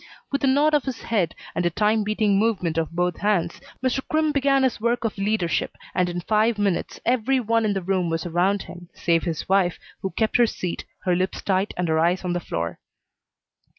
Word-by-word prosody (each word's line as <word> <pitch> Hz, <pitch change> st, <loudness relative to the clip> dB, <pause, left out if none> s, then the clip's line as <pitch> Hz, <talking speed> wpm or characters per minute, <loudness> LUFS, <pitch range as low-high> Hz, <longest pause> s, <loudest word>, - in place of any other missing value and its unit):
With 280 Hz, 0 st, -1 dB
a -, -, +4 dB
nod 290 Hz, +3 st, +4 dB
of 295 Hz, -3 st, +2 dB
his 260 Hz, -4 st, -5 dB
head 195 Hz, -8 st, 0 dB, 0.2 s
and 175 Hz, -, -1 dB
a 175 Hz, -, +3 dB
time 210 Hz, +4 st, +2 dB
beating 210 Hz, -1 st, +2 dB
movement 185 Hz, -7 st, +1 dB
of 160 Hz, -, -1 dB
both 175 Hz, 0 st, -1 dB
hands, 180 Hz, -5 st, 0 dB, 0.2 s
Mr. 255 Hz, +1 st, +1 dB
Crimm 310 Hz, 0 st, +2 dB
began 275 Hz, -1 st, +2 dB
his 255 Hz, -4 st, 0 dB
work 235 Hz, +1 st, +1 dB
of 225 Hz, -, -1 dB
leadership, 195 Hz, -3 st, -1 dB, 0.2 s
and 180 Hz, -1 st, +1 dB
in 175 Hz, 0 st, -3 dB
five 215 Hz, +4 st, +2 dB
minutes 200 Hz, -4 st, -1 dB
every 255 Hz, +2 st, +2 dB
one 230 Hz, -1 st, +1 dB
in 210 Hz, -, +1 dB
the 195 Hz, -2 st, -3 dB
room 185 Hz, -2 st, 0 dB
was 165 Hz, +1 st, -2 dB
around 180 Hz, +4 st, +1 dB
him, 175 Hz, -1 st, -11 dB
save 165 Hz, 0 st, +1 dB
his 165 Hz, -3 st, -3 dB
wife, 190 Hz, -2 st, +2 dB, 0.2 s
who 190 Hz, -, -2 dB
kept 220 Hz, +3 st, +1 dB
her 240 Hz, -1 st, +5 dB
seat, 180 Hz, -5 st, -4 dB, 0.2 s
her 180 Hz, -1 st, +2 dB
lips 185 Hz, +1 st, -2 dB
tight 190 Hz, +1 st, +1 dB
and 180 Hz, -1 st, 0 dB
her 160 Hz, 0 st, +2 dB
eyes 175 Hz, +3 st, +2 dB
on 175 Hz, -, 0 dB
the 175 Hz, -, 0 dB
floor. 85 Hz, -, -4 dB
195 Hz, 215 wpm, -24 LUFS, 175-230 Hz, 0.2 s, her